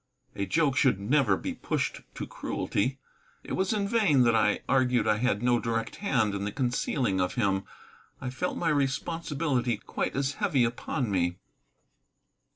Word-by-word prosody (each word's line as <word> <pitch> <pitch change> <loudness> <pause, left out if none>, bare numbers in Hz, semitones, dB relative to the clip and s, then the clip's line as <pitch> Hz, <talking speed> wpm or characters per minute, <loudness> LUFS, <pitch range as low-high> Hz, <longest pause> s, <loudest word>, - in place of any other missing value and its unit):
A 100 - -3
joke 145 - +2
should 125 -6 +3
never 110 -1 +2
be - - -4
pushed - - -2
to - - -4
cruelty. 130 +7 -2 0.5
It - - -6
was 190 0 0
in 205 -2 0
vain 200 - +4
that 120 -1 +4
I 105 -2 +2
argued 125 -3 +2
I 105 -1 +3
had 115 -2 0
no 120 -1 +3
direct 115 -1 -2
hand 125 - +1
in 100 0 -3
the 105 - -2
concealing 125 -4 0
of 90 0 -1
him; 100 -4 +1 0.5
I 125 - -4
felt 180 +8 -2
my 170 - 0
responsibility 140 -3 0
quite - - -3
as 140 0 0
heavy 130 -4 +3
upon 120 0 -2
me. 90 -2 0
125 Hz, 160 wpm, -28 LUFS, 105-140 Hz, 0.5 s, vain